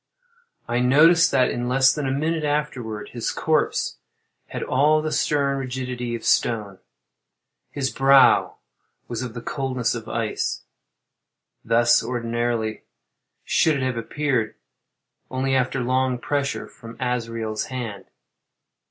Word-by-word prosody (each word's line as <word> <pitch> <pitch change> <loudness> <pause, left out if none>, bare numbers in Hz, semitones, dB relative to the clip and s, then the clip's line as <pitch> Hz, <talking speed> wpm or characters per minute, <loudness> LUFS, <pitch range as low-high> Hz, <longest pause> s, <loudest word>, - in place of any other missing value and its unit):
I 120 +1 0
noticed 155 +7 +5
that 125 - +2
in 120 0 -3
less 130 0 +4
than 145 -2 -3
a - - 0
minute 155 +3 -1
afterward 145 -8 -2
his 120 -2 -3
corpse - - 0 0.5
had - - -5
all 150 +4 +3
the 155 0 -3
stern 140 -3 +1
rigidity 125 -2 -4
of 115 - -7
stone. 105 -5 +1 0.9
His 135 -2 -2
brow 135 0 +5 0.5
was 115 -2 -4
of 125 -2 -6
the 120 - -6
coldness 130 -4 -1
of 115 -2 -6
ice. 115 -1 -2 1.0
Thus, 120 +1 +4
ordinarily, 120 -2 -2 0.6
should 160 - +2
it 135 - -2
have 130 -1 -1
appeared, 125 -1 -1 0.7
only 130 +1 -1
after 130 0 +1
long 130 +1 +1
pressure 140 +2 -2
from 115 -1 -12
Azrael's 115 -3 -2
hand. 115 -7 -6
125 Hz, 125 wpm, -23 LUFS, 115-135 Hz, 1.0 s, noticed